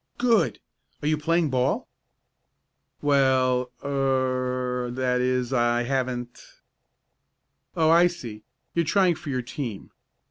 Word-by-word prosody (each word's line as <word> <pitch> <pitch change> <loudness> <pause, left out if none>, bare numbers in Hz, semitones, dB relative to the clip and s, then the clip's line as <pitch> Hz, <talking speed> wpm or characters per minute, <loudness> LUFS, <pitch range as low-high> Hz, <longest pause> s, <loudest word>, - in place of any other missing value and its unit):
"Good! 240 -2 +2 0.4
Are - - 0
you 155 - +3
playing 160 0 +1
ball?" 130 0 0 1.2
"Well 130 -3 +2 0.2
er 130 -2 0
I 120 - -6
that 125 -1 0
is 125 0 0
I 120 -1 +2
haven't 125 -1 -3 0.7
" - - -48
"Oh, 160 -1 +4
I 170 +1 +6
see. 120 -12 -7 0.3
You're 170 - +2
trying 185 +2 +3
for 155 - -9
your 130 -2 -2
team. 120 -5 -6
130 Hz, 120 wpm, -25 LUFS, 125-150 Hz, 1.2 s, I